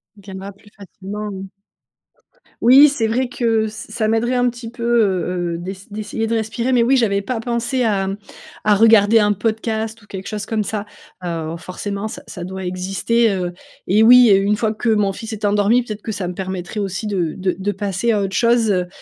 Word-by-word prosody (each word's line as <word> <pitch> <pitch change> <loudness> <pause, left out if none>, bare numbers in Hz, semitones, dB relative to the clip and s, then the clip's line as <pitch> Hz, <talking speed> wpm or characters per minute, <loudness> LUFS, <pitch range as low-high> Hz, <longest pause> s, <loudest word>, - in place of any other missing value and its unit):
Viendra 195 -1 -9
plus 205 +1 -21
facilement, 205 +1 -7
mmh. 195 0 -7 1.1
Oui, 270 +5 +8
c'est 260 -5 -1
vrai 245 +4 0
que, 225 -3 0
ç - - -4
ça 215 0 -4
m'aiderait 225 +3 +1
un 245 0 +2
petit 235 -1 -8
peu, 235 -1 -8
heu 185 -7 +1
heu, - - -3
d'ess 190 +4 -8
d'essayer 215 +1 -3
de 225 - -2
respirer, 225 +3 -1
mais 240 - +4
oui, 260 +3 +3
j'avais 200 -4 +1
pas 240 +3 -3
pensé 240 +2 -1
à, 200 -4 +1
mmh, 195 +1 -3 0.5
à 210 - +4
regarder 220 0 +5
un 210 -1 +3
podcast 220 +1 -2
ou 205 - -20
quelque 190 -1 -7
chose 210 -1 -5
comme 220 -2 -1
ça. 205 0 -4 0.4
Heu, 165 -2 -3
forcément 200 +4 -5
ça 220 - -8
ça 175 - -8
doit 190 +1 -6
exister, 195 +5 0
heu, 180 -2 -2 0.3
et 205 +4 +3
oui, 245 +1 +8
et 195 - +6
une 200 +2 +1
fois 220 0 0
que 230 +2 -2
mon 210 -3 +2
fils 225 +3 -7
est 215 -1 -4
endormi, 205 +4 +3
peut-être 215 -3 -7
que 220 - -5
ça 195 -3 -4
me 180 - -4
permettrait 190 +2 -5
aussi 195 +2 -3
de 180 -6 -1
de 185 -2 -1
de 200 +2 -1
passer 205 +3 -1
à 205 -2 +1
autre 195 -1 -3
chose, 235 -2 +3
heu 180 -2 0
210 Hz, 210 wpm, -19 LUFS, 195-230 Hz, 1.1 s, Oui